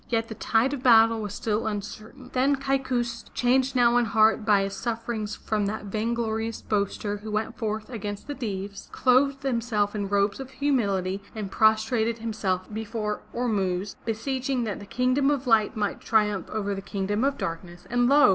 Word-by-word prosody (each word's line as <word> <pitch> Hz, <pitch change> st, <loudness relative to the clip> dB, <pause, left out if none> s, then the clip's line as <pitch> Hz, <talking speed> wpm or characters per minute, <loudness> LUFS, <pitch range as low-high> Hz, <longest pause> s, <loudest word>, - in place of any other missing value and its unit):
Yet 230 Hz, -1 st, 0 dB
the -, -, -4 dB
tide 225 Hz, +4 st, +1 dB
of 280 Hz, -, -4 dB
battle 225 Hz, -2 st, +6 dB
was 205 Hz, -2 st, -4 dB
still 220 Hz, +1 st, -1 dB
uncertain. 215 Hz, +4 st, -6 dB
Then 270 Hz, +2 st, +3 dB
Kaikous, 260 Hz, -3 st, -1 dB
changed 260 Hz, +2 st, +2 dB
now 240 Hz, -1 st, +5 dB
in 240 Hz, -, +3 dB
heart 220 Hz, 0 st, +3 dB
by 205 Hz, -2 st, +4 dB
his 195 Hz, 0 st, -3 dB
sufferings 225 Hz, 0 st, -3 dB
from 210 Hz, -2 st, -1 dB
that 215 Hz, +1 st, -4 dB
vainglorious 225 Hz, +1 st, -2 dB
boaster 205 Hz, 0 st, -1 dB
who 215 Hz, +1 st, -8 dB
went 215 Hz, +2 st, -2 dB
forth 215 Hz, -1 st, -3 dB
against 205 Hz, -4 st, -5 dB
the 290 Hz, -, -4 dB
Deevs, 200 Hz, -6 st, -5 dB
clothed 275 Hz, +2 st, +3 dB
himself 230 Hz, -5 st, 0 dB
in 205 Hz, -2 st, -3 dB
robes 200 Hz, +1 st, +1 dB
of 265 Hz, -1 st, -6 dB
humility 200 Hz, -9 st, 0 dB
and 205 Hz, -3 st, -5 dB
prostrated 220 Hz, +2 st, +2 dB
himself 205 Hz, -5 st, -2 dB
before 215 Hz, -1 st, -3 dB
Ormuzd, 200 Hz, -5 st, -1 dB
beseeching 255 Hz, +3 st, -1 dB
that 210 Hz, -4 st, -3 dB
the 205 Hz, -, -10 dB
Kingdom 255 Hz, +4 st, +2 dB
of 280 Hz, -2 st, 0 dB
Light 225 Hz, -1 st, +3 dB
might 205 Hz, -1 st, -1 dB
triumph 210 Hz, -4 st, +1 dB
over 205 Hz, -2 st, -2 dB
the 195 Hz, -, -4 dB
Kingdom 200 Hz, +3 st, -2 dB
of 275 Hz, 0 st, +1 dB
Darkness, 175 Hz, +1 st, -5 dB
and 245 Hz, 0 st, +2 dB
lo! 290 Hz, -3 st, +7 dB
220 Hz, 175 wpm, -26 LUFS, 205-245 Hz, -, lo